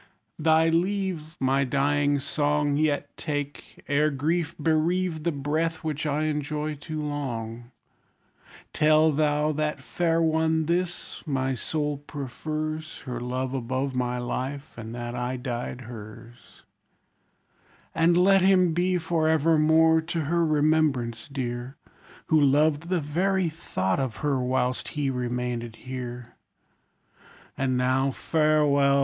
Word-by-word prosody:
Thy 160 +1 +4
leave, 175 -2 -1
My 135 +1 +2
dying 145 +2 +1
song, 145 +1 0
Yet 150 -1 0
take, 145 -2 -5
ere 150 +2 +3
grief 160 +4 -1
bereave 160 +2 +1
The 170 +2 0
breath 155 +3 -1
which 155 -1 -2
I 150 +1 0
enjoy 150 0 -2
too 155 +1 -5
long, 120 -5 -4 1.0
Tell 155 +1 +4
thou 150 0 +1
that 150 0 -1
fair 165 -1 0
one 160 0 +2
this: 175 +2 -2
my 135 -2 0
soul 150 +3 -2
prefers 155 +3 -5
Her 125 -3 -4
love 130 +1 -2
above 130 +1 -2
my 125 -1 -1
life; 135 +4 -4
and 115 0 -7
that 120 0 -5
I 125 +1 -2
died 125 0 -4
her's: 115 0 -12 1.3
And 170 +1 +3
let 195 +2 +5
him 185 -3 +4
be, 180 +2 +1
for 160 -2 0
evermore, 160 +1 +4
to 165 0 -3
her 170 +3 +1
remembrance 150 -7 +1
dear, 125 -1 -4 0.5
Who 155 -2 +3
loved 150 +3 +3
the 180 -3 +1
very 180 +5 +1
thought 95 - -2
of 130 -4 -2
her 140 -3 +2
whilst 125 0 0
he 140 -2 +1
remained 125 -2 -3
here. 125 -2 -7 1.2
And 130 -1 0
now 130 +2 +2
farewell! 145 -2 +3
145 Hz, 125 wpm, -26 LUFS, 130-160 Hz, 1.3 s, let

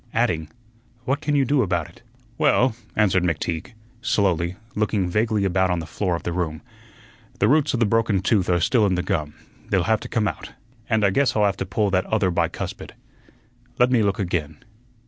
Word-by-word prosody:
adding, 85 -10 0 0.6
"What 135 +3 0
can 150 -1 0
you 140 -2 +3
do 140 +1 +2
about 85 -6 -1
it?" 85 - -19 0.4
"Well," 130 -5 +3 0.2
answered 95 -4 +3
McTeague, 85 +1 -2 0.3
slowly, 95 - +1 0.2
looking 105 -3 0
vaguely 105 +2 +1
about 95 0 +2
on 90 - +1
the 80 - -4
floor 90 +2 -2
of 85 - -6
the 85 - -3
room, 85 -1 -3 0.7
"the 105 - +2
roots 145 +1 +3
of - - -1
the 115 - +4
broken 110 -2 +2
tooth 95 -1 +1
are 90 -1 +3
still 105 +5 +3
in 95 - +1
the 90 - -1
gum; 75 -5 -2 0.3
they'll 95 -3 +2
have 110 +3 +2
to - - -9
come 110 -3 0
out, - - -6 0.4
and 110 -3 +2
I 100 - +3
guess 130 +3 +2
I'll 105 -1 +3
have 100 -1 0
to 95 - -4
pull 100 +1 0
that 95 0 +1
other 105 -4 +1
bicuspid. 85 -1 -3 0.8
Let 125 +1 +3
me 120 -3 +4
look 100 -2 +1
again. 85 -6 -2
100 Hz, 200 wpm, -23 LUFS, 90-115 Hz, 0.8 s, the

